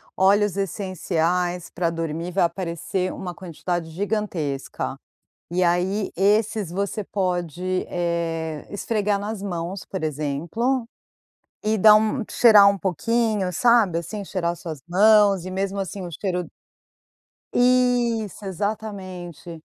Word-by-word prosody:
óleos 200 +1 +3
essenciais 180 -2 -1
para 175 -1 0
dormir, 165 +1 -3
vai 190 0 +2
aparecer 175 +1 -2
uma 180 -2 -6
quantidade 175 -1 -4
gigantesca. 175 -6 -3 0.5
E 180 +1 +2
aí 180 +4 +1
esses 205 -1 +2
você 200 +3 -2
pode, 185 -1 -2
eh, 165 -3 -2
esfregar 205 -1 0
nas 205 0 -4
mãos, 180 0 -4
por 190 -4 -5
exemplo, 165 - -1 0.7
e 215 +1 +1
dar 210 +1 +8
um 220 +3 +2
cheirar 210 -4 +7
um 200 - 0
pouquinho, 205 +2 0
sabe 220 -3 +4
assim, 200 +5 -6
cheirar 180 -3 -1
as - - -13
suas 155 -5 -7
mãos 200 0 +5
e 185 - -5
mesmo 195 +1 -2
assim 190 -1 -4
o - - -6
cheiro 180 +1 -2 1.1
Isso 245 -4 +2
exatamente, 185 -4 -5
185 Hz, 120 wpm, -23 LUFS, 170-210 Hz, 1.1 s, dar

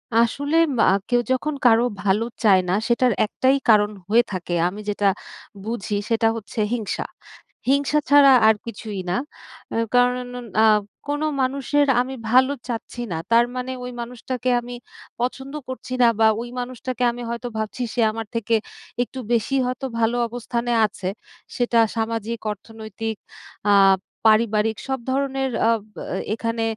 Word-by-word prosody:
আসলে 280 +7 +2 0.2
ব - - -4
আ - - +4 0.2
কেউ 245 0 +3
যখন 290 +4 0
কারো 230 0 +6 0.2
ভালো 205 +3 +2 0.2
চায় 190 -3 +6
না 180 - +2
সেটার 245 0 +3
একটাই 260 +5 +2
কারণ 210 -1 +5 0.2
হয়ে 235 +2 +5
থাকে 180 -2 -4
আমি 205 +4 -5
যেটা 205 -1 +1 0.6
বুঝি 215 -1 -3
সেটা 225 0 +2
হচ্ছে 220 0 -7
হিংসা। 225 -4 -2 0.6
হিংসা 285 +2 +3
ছাড়া 285 -1 +7 0.2
আর 220 - +6
কিছুই 215 -3 -6
না 180 - 0 0.6
এ - - 0 0.2
কারণ 250 0 +3 0.3
আ - - +6 0.4
কোনো 290 +1 -1 0.2
মানুষের 280 +2 +1
আমি 265 +1 -4 0.2
ভালো 260 +2 +5 0.2
চাচ্ছি 240 0 -5
না, - - -1 0.2
তার 235 +1 +6
মানে 255 +1 -3
ওই 250 - -5
মানুষটাকে 250 +1 -4
আমি 245 +1 -8 0.4
পছন্দ 265 +3 -3
করছি 255 0 -6
না 240 - +7
বা 220 - +6
ওই 240 - -6
মানুষটাকে 250 0 -4
আমি 245 +1 -8
হয়তো 235 +1 -4
ভাবছি 220 +3 -3
সে 240 - +1
আমার 225 -1 -6
থেকে 230 0 -1 0.5
একটু 260 +2 -9
বেশিই 250 +4 +1
হয়তো 255 +2 -3
ভালো 230 +1 +2
অবস্থানে 240 0 -3
আছে। 190 -3 -5 0.5
সেটা 240 -1 +2 0.2
সামাজিক, 225 0 -2
অর্থনৈতিক, 220 +1 -6 0.5
আ - - +6 0.5
পারিবারিক 220 0 +3
সব 265 -1 -1
ধরনের 270 0 0 0.2
আ - - +4 0.2
ব - - -47 0.2
এ 215 - -3
এখানে 230 0 -2
235 Hz, 150 wpm, -22 LUFS, 220-255 Hz, 0.6 s, ছাড়া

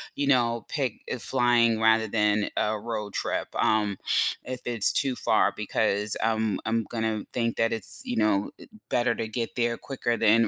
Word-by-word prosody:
you 140 -1 -1
know, 120 -4 +2
pick, 135 -7 -1 0.2
uh, - - -3
flying 120 -3 +2
rather 110 0 +4
than 105 -1 +1
a 105 0 0
road 105 -2 -4
trip, - - -2
um, 105 -3 +2 0.5
if 125 -1 -5
it's 115 -4 +1
too 135 -3 0
far, - - +2
because 105 +1 0
I'm 110 -3 +1
I'm 115 0 0
gonna 110 -2 -2
think 115 -1 -1
that 115 0 +1
it's 110 -4 +1
you - - -3
know, 105 -2 +1
it - - -15 0.2
better 120 -1 +2
to 110 - -3
get 115 +2 -4
there 120 -1 +1
quicker 120 -3 -2
than 115 +1 +4
115 Hz, 180 wpm, -26 LUFS, 110-120 Hz, 0.5 s, rather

